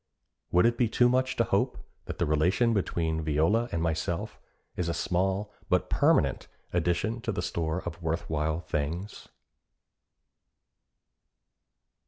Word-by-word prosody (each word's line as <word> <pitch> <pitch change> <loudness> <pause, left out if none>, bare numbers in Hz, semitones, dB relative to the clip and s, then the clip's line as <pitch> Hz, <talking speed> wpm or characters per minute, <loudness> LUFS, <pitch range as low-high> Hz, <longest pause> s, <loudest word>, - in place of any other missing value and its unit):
Would 90 +3 +4
it 120 0 +2
be 120 -3 +3
too 120 +2 +4
much 130 +1 +1
to 115 - +3
hope - - 0 0.3
that - - -6
the - - +1
relation 90 +10 +2
between 80 -5 0
Viola 80 +10 +2
and 80 - -1
myself 85 +1 -2 0.4
is 85 -2 -1
a 85 - -1
small 95 +3 -1 0.2
but - - +1
permanent - - +2 0.3
addition 90 +7 0
to 115 - -2
the 90 -3 -3
store 80 +1 -2
of 85 0 -6
worth 80 0 -2
while 80 +1 -1
things? 85 +7 -4
85 Hz, 135 wpm, -28 LUFS, 80-110 Hz, 0.4 s, Would